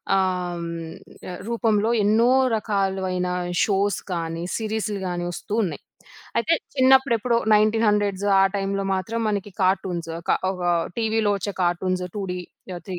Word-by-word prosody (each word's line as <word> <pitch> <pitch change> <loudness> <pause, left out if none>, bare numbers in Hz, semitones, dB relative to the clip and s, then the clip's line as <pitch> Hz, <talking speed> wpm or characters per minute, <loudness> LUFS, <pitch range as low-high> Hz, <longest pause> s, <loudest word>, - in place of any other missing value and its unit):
ఆహ్, 180 -2 0
హ్మ్. 165 0 -6 0.4
ఆహ్, 180 - -6
రూపంలో 225 -2 +1
ఎన్నో 220 +4 +4 0.3
రకాలవైన 190 -4 -1 0.4
షోస్ 200 -1 +1
కానీ, 165 -1 -3
సీరీస్లు 215 -2 -2
గాని 175 -1 -3
ఒస్తూ 205 +4 -7
ఉన్నాయి. 165 -6 -3 0.6
అయితే 325 +8 +2 0.2
చిన్నప్పుడెప్పుడో 260 -3 +4 0.2
1900స్ 210 -2 +2 0.2
ఆ - - +6
టైంలో 195 0 -1
మాత్రం 225 +5 -2
మనకి 205 -1 -2
కార్టూన్స్ 185 -3 0 0.2
క - - +3 0.2
ఒక 180 -2 -5 0.4
టీవీలో 220 -2 +1
ఒచ్చే 200 +1 -3
కార్టూన్స్ 180 +1 0
2 205 - -2
డీ 180 - -4 0.4
ఆహ్, 175 - -8
3 180 -2 -4
195 Hz, 135 wpm, -23 LUFS, 180-215 Hz, 0.6 s, ఆ